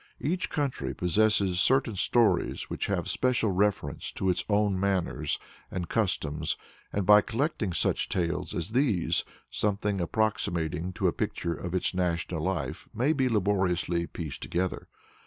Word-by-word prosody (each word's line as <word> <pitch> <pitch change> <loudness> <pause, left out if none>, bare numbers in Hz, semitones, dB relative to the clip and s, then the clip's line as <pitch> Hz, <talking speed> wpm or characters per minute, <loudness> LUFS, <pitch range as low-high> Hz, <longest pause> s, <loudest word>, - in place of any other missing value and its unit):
Each 175 +5 -1
country 145 -5 -2
possesses 95 0 +2
certain 130 -1 +3
stories 105 -1 +2
which - - -2
have - - -1
special 125 -5 +1
reference 100 +1 0
to 95 -1 +1
its 90 - -1
own 100 -2 +2
manners 90 -6 0 0.3
and 90 -2 -4
customs, 80 -8 0 0.3
and 100 -2 -1
by 105 +2 +8
collecting 120 - -1
such - - 0
tales 90 0 -1
as 85 +5 -3
these, 120 - +2 0.3
something 100 -1 0
approximating 85 -4 0
to - - +1
a - - +2
picture 85 -1 -2
of 85 +3 -5
its 90 - 0
national 85 -2 -1
life 80 -7 -3
may 130 +8 +2
be 135 -4 +1
laboriously 90 -5 +1
pieced 80 -6 -6
together. 90 +1 -2
95 Hz, 140 wpm, -28 LUFS, 85-110 Hz, 0.3 s, by